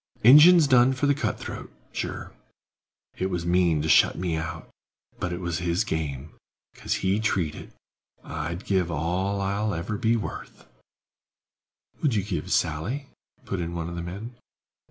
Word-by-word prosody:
"Ingen's 150 Hz, +7 st, +9 dB
done 130 Hz, -1 st, +5 dB
for 130 Hz, +2 st, -1 dB
the 145 Hz, -, +4 dB
cut 150 Hz, -, -2 dB
throat, -, -, -7 dB, 0.2 s
sure. -, -, -5 dB, 0.9 s
It 95 Hz, -, 0 dB
was 90 Hz, -2 st, -3 dB
mean 85 Hz, -3 st, +2 dB
to -, -, -1 dB
shut -, -, +5 dB
me 90 Hz, -2 st, -1 dB
out; 80 Hz, +1 st, -5 dB, 0.5 s
but 90 Hz, -, -2 dB
it 90 Hz, -, -4 dB
was 85 Hz, -3 st, -3 dB
his 90 Hz, +3 st, 0 dB
game, 75 Hz, -6 st, -4 dB, 0.4 s
'cause -, -, -3 dB
he 95 Hz, +3 st, +2 dB
treed 95 Hz, -8 st, 0 dB
it. -, -, -10 dB, 0.5 s
I'd 85 Hz, +5 st, -5 dB
give 95 Hz, -3 st, +1 dB
all 90 Hz, +5 st, -1 dB
I'll 100 Hz, +1 st, -1 dB
ever 100 Hz, +5 st, -4 dB
be 115 Hz, +1 st, +2 dB
worth—" 110 Hz, -, -6 dB, 1.4 s
"Would 140 Hz, -7 st, +1 dB
you 100 Hz, -, +1 dB
give 95 Hz, -3 st, -4 dB
Sally?" 105 Hz, -, -1 dB, 0.4 s
put 95 Hz, -, -3 dB
in 85 Hz, 0 st, -4 dB
one 85 Hz, -1 st, -3 dB
of 85 Hz, -, -7 dB
the 85 Hz, -, -4 dB
men. 100 Hz, +8 st, -7 dB
90 Hz, 160 wpm, -26 LUFS, 85-110 Hz, 1.4 s, Ingen's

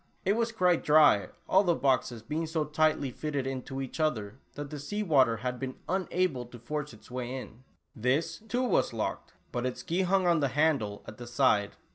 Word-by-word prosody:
It 195 Hz, -, +4 dB
was 230 Hz, +1 st, 0 dB
quite 180 Hz, -6 st, +2 dB
dry, 150 Hz, -9 st, +5 dB, 0.2 s
all 190 Hz, +2 st, +5 dB
the 175 Hz, -3 st, +2 dB
boxes 125 Hz, -4 st, +1 dB
being 160 Hz, +7 st, -2 dB
so 160 Hz, -1 st, -1 dB
tightly 150 Hz, -2 st, +1 dB
fitted 145 Hz, 0 st, -3 dB
into 135 Hz, 0 st, -4 dB
each 135 Hz, +3 st, -5 dB
other, 125 Hz, -7 st, -1 dB, 0.2 s
that 145 Hz, -1 st, -6 dB
the 150 Hz, -, -5 dB
sea 205 Hz, +9 st, -3 dB
water 135 Hz, -, +4 dB
had 125 Hz, +2 st, -3 dB
been 130 Hz, -1 st, -4 dB
unable 180 Hz, -8 st, 0 dB
to 120 Hz, -, -11 dB
force 150 Hz, +5 st, -4 dB
its 110 Hz, +1 st, -16 dB
way 125 Hz, -1 st, -4 dB
in. 125 Hz, -2 st, -9 dB, 0.3 s
This, 130 Hz, +7 st, 0 dB
too, 245 Hz, +4 st, 0 dB
was 225 Hz, -, +2 dB
locked, 110 Hz, -2 st, -3 dB, 0.2 s
but 120 Hz, -, -2 dB
its 125 Hz, -, -5 dB
key 175 Hz, +3 st, 0 dB
hung 190 Hz, 0 st, +2 dB
on 170 Hz, -2 st, +4 dB
the 140 Hz, -, +2 dB
handle 135 Hz, -8 st, +1 dB
at 110 Hz, -, -10 dB
the 120 Hz, -, -8 dB
side. 120 Hz, -5 st, +2 dB
140 Hz, 200 wpm, -29 LUFS, 125-165 Hz, 0.3 s, dry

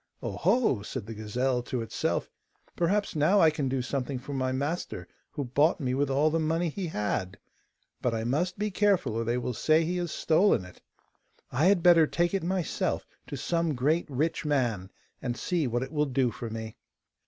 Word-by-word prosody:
'Oh, -, -, -2 dB
ho!' 220 Hz, -, +2 dB
said 110 Hz, +2 st, -5 dB
the 115 Hz, -, -7 dB
gazelle 125 Hz, +4 st, -1 dB
to 120 Hz, -1 st, -3 dB
itself, 115 Hz, -, -1 dB, 0.5 s
'perhaps 200 Hz, +3 st, 0 dB
now 155 Hz, +7 st, +4 dB
I 160 Hz, -3 st, +6 dB
can 145 Hz, -3 st, -2 dB
do 130 Hz, -1 st, -1 dB
something 135 Hz, +1 st, -2 dB
for 135 Hz, +3 st, -7 dB
my 130 Hz, -1 st, 0 dB
master 145 Hz, +7 st, -3 dB, 0.3 s
who 145 Hz, -, -2 dB
bought 145 Hz, +8 st, +2 dB
me 130 Hz, -4 st, -1 dB
with 140 Hz, +1 st, +1 dB
all 145 Hz, +3 st, +3 dB
the 165 Hz, -, +1 dB
money 165 Hz, +2 st, 0 dB
he 180 Hz, +3 st, -4 dB
had; 105 Hz, -, -2 dB, 0.6 s
but 125 Hz, -, +1 dB
I 110 Hz, -1 st, -2 dB
must 160 Hz, +10 st, 0 dB
be 210 Hz, +1 st, -1 dB
careful 190 Hz, -, +2 dB
or 115 Hz, +1 st, -1 dB
they 120 Hz, +2 st, 0 dB
will 125 Hz, 0 st, -2 dB
say 155 Hz, +7 st, +3 dB
he 180 Hz, +2 st, -1 dB
has 175 Hz, -2 st, -2 dB
stolen 160 Hz, -, +3 dB
it. 90 Hz, -, -15 dB, 0.7 s
I 140 Hz, +6 st, +2 dB
had 190 Hz, -2 st, +4 dB
better 170 Hz, -3 st, +7 dB
take 175 Hz, +3 st, 0 dB
it 195 Hz, -, +1 dB
myself 180 Hz, -1 st, -1 dB, 0.2 s
to -, -, -5 dB
some 165 Hz, -3 st, 0 dB
great 150 Hz, +7 st, +1 dB
rich 155 Hz, +6 st, -1 dB
man, 120 Hz, -, 0 dB, 0.3 s
and 120 Hz, -2 st, -3 dB
see 165 Hz, +4 st, 0 dB
what 120 Hz, +1 st, -1 dB
it 130 Hz, -, -7 dB
will 150 Hz, -1 st, +1 dB
do 130 Hz, -2 st, +1 dB
for 115 Hz, -, -6 dB
me. 110 Hz, 0 st, -6 dB
145 Hz, 200 wpm, -28 LUFS, 125-170 Hz, 0.7 s, better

